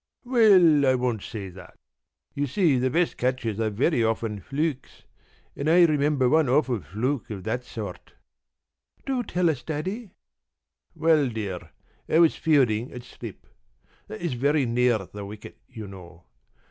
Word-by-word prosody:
p> 250 - -14
"Well, 185 - +6
I - - +2
won't 125 -4 -1
say 100 -2 -7
that. 95 +1 -14 0.6
You 145 0 -1
see, 150 -3 +2
the 130 +1 +1
best 170 +6 0
catches 125 -4 -1
are 110 -1 +1
very 120 +5 +1
often 110 -2 -1
flukes, 145 - -4 0.5
and 145 +2 -2
I 175 +1 +7
remember 145 -4 +2
one 155 0 +3
awful 130 -5 +1
fluke 110 - -3
of 100 -4 -6
that 120 +3 -2
sort." 105 -6 -8 0.9
"Do 265 -2 -1
tell 180 -6 0
us, 150 -6 0
Daddy?" 185 +8 -5 0.8
"Well, 155 -4 +3
dear, 100 -7 -5 0.4
I - - +3
was 165 -1 +5
fielding 125 -7 +2
at 125 - -8
slip. 120 -3 -10 0.6
That 110 - -8
is 170 -6 -2
very 140 +3 +1
near 120 -3 +1
the 100 +2 -9
wicket, 105 +2 -10
you 110 -4 -8
know. 90 -3 -12
125 Hz, 155 wpm, -25 LUFS, 110-155 Hz, 0.9 s, I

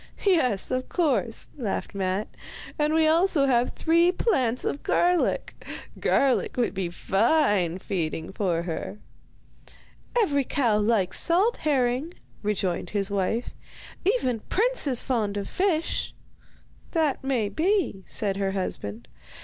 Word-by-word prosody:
'Yes, 255 - +3
of 255 0 -2
course,' 275 -9 0
laughed 215 -6 -3
Matte, 195 +1 -1 0.5
'and 300 0 +2
we 320 0 +3
have 315 0 +4
also 275 -9 +3
three 335 +2 +2
plants 260 - 0
of 285 - -2
garlic. 355 -1 +1 0.4
Garlic 270 -2 +1
would 240 -3 +1
be 190 -3 -2
fine 195 - +1
feeding 165 -4 -3
for 180 -4 -1
her.' 170 +4 -5 1.2
'Every 285 -11 +2
cow 235 -5 +1
likes 210 -3 +1
salt 380 +8 +3
herring,' 275 +2 0 0.3
rejoined 190 -4 -1
his 200 -1 -2
wife. 200 +4 -1 0.5
'Even 350 - +1
Prince 485 -3 +1
is 255 -4 +1
fond 215 -6 -1
of 200 - -3
fish.' 350 -4 -1 0.8
'That 310 -6 +1
may 255 -6 0
be,' 330 - 0
said 200 -2 -2
her 195 -1 -1
husband. 120 - -4
245 Hz, 125 wpm, -26 LUFS, 195-315 Hz, 1.2 s, have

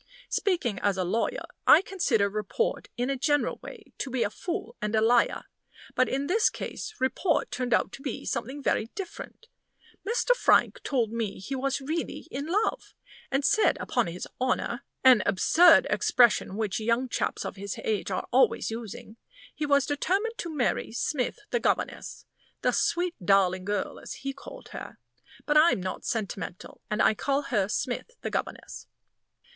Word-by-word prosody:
Speaking 335 - 0
as 200 -2 +1
a 185 - +1
lawyer, 230 - -1 0.2
I 360 - +8
consider 275 - +1
report, 215 - -2
in 245 +3 0
a - - 0
general 290 +2 +1
way, - - -11
to 275 - -3
be 255 -2 0
a 205 - -1
fool 365 - -5
and 210 +1 -1
a - - +4
liar. 235 +2 +3 0.5
But 255 - +2
in 275 +1 -1
this 430 +9 +3
case 435 - -6
report 260 +6 0
turned 245 0 -3
out - - +2
to - - -10
be 270 -4 -5
something 265 +5 -3
very 220 - +1
different. 390 +4 -8 0.6
Mr. 480 +3 +2
Frank - - +3
told 240 -6 0
me 225 -3 -3
he 195 +9 -6
was 275 +1 -1
really 315 +5 -4
in 280 +3 -4
love, 415 +6 -1 0.3
and 275 +1 0
said 435 - +3
upon 245 -5 0
his 170 +2 -6
honor 255 -1 -1 0.2
(an 255 -4 +7
absurd 320 - +6
expression 240 -5 +3
which 220 0 -1
young 230 +4 +1
chaps - - -2
of - - -5
his 200 0 -5
age 210 -3 -1
are 185 - -3
always 240 -3 +3
using) 225 -1 -7 0.4
he 300 - -3
was 280 -1 +4
determined 390 - -1
to 340 - -3
marry 285 -8 -1
Smith, 250 +3 -1
the 480 - +2
governess - - -2 0.4
the - - +3
sweet, 350 0 +1
darling 185 -1 +3
girl, 205 0 -2
as - - -8
he 275 - -1
called - - -11
her; - - -8 0.5
but 295 - +1
I'm 310 - +5
not 185 0 -5
sentimental, 200 -5 -4
and 210 - +1
I - - +5
call 280 +5 0
her 200 -7 0
Smith, 245 - -2
the - - -3
governess. - - -5
255 Hz, 170 wpm, -27 LUFS, 215-305 Hz, 0.6 s, I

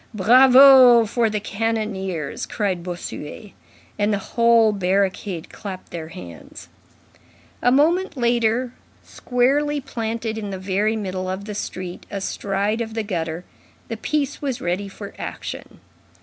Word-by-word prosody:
"Bravo 255 +2 +7
for 230 +1 +1
the 210 0 -2
cannoneers!" 200 -7 -3
cried 195 -5 -2
Bossuet. 175 +2 -7 0.5
And 205 +1 +2
the 205 - +1 0.2
whole 230 -2 +5
barricade 190 -2 -1
clapped 195 -4 -8
their 165 -2 -6
hands. 85 - -11 0.9
A 245 - +3
moment 330 +5 +2
later, 240 0 +1 0.3
squarely 285 +4 0
planted 225 -4 -4
in 205 -2 -5
the 190 - -5
very 200 +4 0
middle 185 -3 -4
of 190 +2 -4
the 210 - -6
street, 185 -3 -6
astride 200 +2 -2
of 225 -1 -5
the 225 - -1
gutter, 170 -3 -4 0.4
the 225 - -4
piece 290 +4 -2
was 270 -4 -2
ready 185 0 -2
for 200 +1 -9
action. - - -7
215 Hz, 130 wpm, -22 LUFS, 190-240 Hz, 0.9 s, Bravo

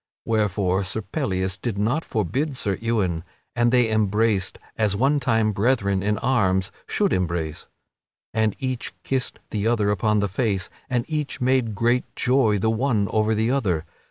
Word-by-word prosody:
Wherefore 100 -3 +1
Sir 100 +3 -3
Pellias 95 -9 -2
did 115 -5 -3
not 120 +10 +1
forbid 130 - -1
Sir 100 -5 0
Ewain, 100 -8 0 0.3
and 120 0 +3
they 120 -3 +3
embraced, 105 -2 +1 0.2
as 105 -3 +1
one 135 +7 +2
time 115 -4 +2
brethren 100 -2 +1
in 105 +1 0
arms 95 -6 +1 0.2
should - - +1
embrace. 85 -4 -2 0.7
And 110 -2 +1
each 130 -3 -3
kissed 130 -2 -1
the 105 0 0
other 110 -3 +2
upon 105 +2 +1
the 100 - +1
face, 95 -1 -1 0.2
and 120 -1 0
each 150 -3 -3
made 125 -4 +1
great 120 +4 +2
joy 125 -5 +3
the 110 +3 +1
one 110 -4 +1
over 110 0 +2
the 110 +3 +1
other. 95 - 0
110 Hz, 155 wpm, -24 LUFS, 100-125 Hz, 0.7 s, and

